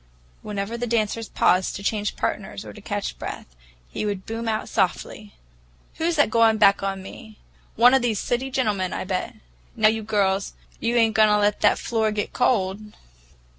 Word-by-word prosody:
Whenever 210 +3 -4
the 245 - -2
dancers 225 -1 -1
paused 185 +1 +2
to 200 - -7
change 210 0 -1
partners 200 0 -4
or - - -9
to 210 - -12
catch 205 -1 -4
breath, - - -6 0.4
he - - -5
would 200 -3 -3
boom 225 +1 -5
out 215 -1 -1
softly, 205 +1 -2 0.6
"Who's 330 +1 0
that 290 -7 +3
goin' 225 -1 +4
back 200 -2 +5
on 195 -1 -3
me? 215 +2 -11 0.4
One 245 +3 +6
of 265 - +4
these 225 -4 0
city 255 +2 -2
gentlemen, 210 -8 -1
I - - -3
bet! 185 0 -3 0.4
Now, 215 0 +5
you 220 0 -1
girls, 200 -2 0 0.3
you 230 +1 -1
ain't 225 -2 +3
goin' 215 0 +5
to 210 - +4
let 205 0 +1
that - - +4
floor 220 -2 0
get 210 -1 -3
cold?" 205 -6 +1
215 Hz, 180 wpm, -23 LUFS, 200-230 Hz, 0.6 s, One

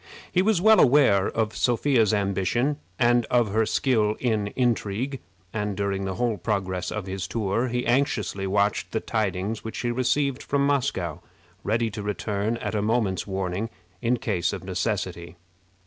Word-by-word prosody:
He 180 - +3
was 210 -2 +2
well 220 +4 +6
aware 120 -8 +5
of 110 -1 -1
Sophia's 120 -2 +2
ambition, 100 +7 0 0.2
and 120 -1 +3
of 120 -4 +2
her 110 0 +2
skill 110 -5 +2
in 110 -4 0
intrigue, 125 +1 0 0.3
and 105 -3 -2
during 100 -1 -1
the 95 -1 -3
whole 120 -1 0
progress 95 -2 -2
of 105 -3 -4
his 95 -2 -4
tour 115 +3 0
he 125 0 -2
anxiously 120 -6 0
watched 100 +1 0
the 110 - +1
tidings 105 -1 -2
which 110 - -6
he 120 - 0
received 130 +2 0
from 140 0 0
Moscow, 125 - 0 0.4
ready 115 +1 0
to 105 - -5
return 105 +2 -2
at - - -4
a 105 - 0
moment's 105 -4 0
warning 95 +2 -2 0.3
in 120 +1 +2
case 90 -7 -1
of - - -6
necessity. 90 -2 -3
110 Hz, 160 wpm, -25 LUFS, 100-120 Hz, 0.4 s, well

